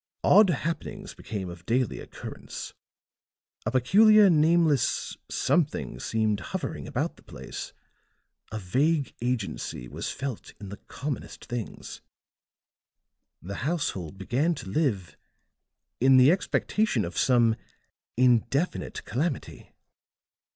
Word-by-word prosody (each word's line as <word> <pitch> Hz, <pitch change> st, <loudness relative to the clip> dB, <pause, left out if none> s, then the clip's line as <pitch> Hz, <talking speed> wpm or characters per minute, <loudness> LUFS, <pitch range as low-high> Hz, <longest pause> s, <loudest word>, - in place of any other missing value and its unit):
Odd 210 Hz, -2 st, +7 dB
happenings 170 Hz, +5 st, -3 dB
became 105 Hz, -6 st, -5 dB
of 85 Hz, -1 st, -9 dB
daily 125 Hz, 0 st, +1 dB
occurrence; -, -, -8 dB, 0.9 s
a -, -, +1 dB
peculiar, 205 Hz, -, +6 dB
nameless 160 Hz, -3 st, +3 dB
something 160 Hz, -4 st, 0 dB
seemed 110 Hz, -2 st, 0 dB
hovering -, -, -5 dB
about -, -, -2 dB
the -, -, -18 dB
place; -, -, -8 dB, 0.8 s
a 110 Hz, -, -3 dB
vague 140 Hz, -, +1 dB
agency 115 Hz, -, -3 dB
was -, -, -5 dB
felt 130 Hz, -5 st, -5 dB
in 100 Hz, -, -8 dB
the 100 Hz, -, -7 dB
commonest 140 Hz, +4 st, -6 dB
things; 120 Hz, -3 st, -6 dB, 1.4 s
the 100 Hz, +3 st, -6 dB
household 120 Hz, -, -2 dB
began 135 Hz, -, 0 dB
to 95 Hz, -, -8 dB
live 100 Hz, -, -1 dB, 0.8 s
in 130 Hz, +1 st, +6 dB
the 130 Hz, +4 st, +7 dB
expectation 190 Hz, -, +1 dB
of 85 Hz, -, -7 dB
some 120 Hz, -3 st, +4 dB, 0.6 s
indefinite 130 Hz, +6 st, +1 dB
calamity." 145 Hz, +3 st, -3 dB
130 Hz, 105 wpm, -27 LUFS, 110-160 Hz, 1.4 s, Odd